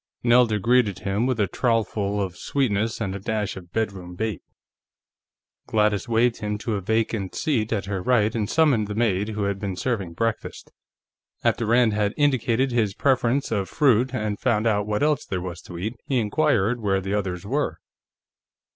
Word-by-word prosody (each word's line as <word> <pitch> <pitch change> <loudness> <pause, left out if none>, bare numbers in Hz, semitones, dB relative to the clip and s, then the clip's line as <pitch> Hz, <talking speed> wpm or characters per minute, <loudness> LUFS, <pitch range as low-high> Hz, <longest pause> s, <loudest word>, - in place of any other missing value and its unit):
Nelda 120 -2 +4
greeted 115 -1 +2
him 100 +5 -1
with 130 -3 -1
a 105 - +4
trowelful 105 -1 0
of 95 -3 -2
sweetness 115 -2 -1
and 100 -4 -2
a 100 - -5
dash 105 +1 -2
of 90 -2 -11
bedroom 95 -5 -3
bait. 110 -2 -3 1.3
Gladys 105 -1 +1
waved 115 +1 +2
him 105 0 -3
to 110 +1 -3
a 100 - -2
vacant 110 -1 -1
seat 120 -9 0
at 100 -4 -1
her 100 -2 -3
right 110 0 +2
and 105 -3 -2
summoned 140 -10 +3
the 105 - -5
maid 105 -3 +1
who 105 -1 -3
had 100 -1 -1
been 95 -2 -3
serving 100 -6 -2
breakfast. 115 +6 -3 0.7
After 115 - +1
Rand 120 -1 +4
had 105 0 0
indicated 130 -3 +2
his 110 -5 0
preference 135 -1 +1
of 100 -4 -1
fruit 130 -4 +3
and 110 -5 -2
found 115 -3 +1
out 105 -2 +1
what 105 +4 0
else 150 -3 +2
there 95 - -3
was 90 -2 -6
to 85 - -10
eat, 105 +6 -3
he 135 - +1
inquired 120 -1 +1
where 95 -2 +1
the 95 +1 -4
others 95 -3 -2
were. 120 - -1
110 Hz, 180 wpm, -24 LUFS, 100-120 Hz, 1.3 s, Nelda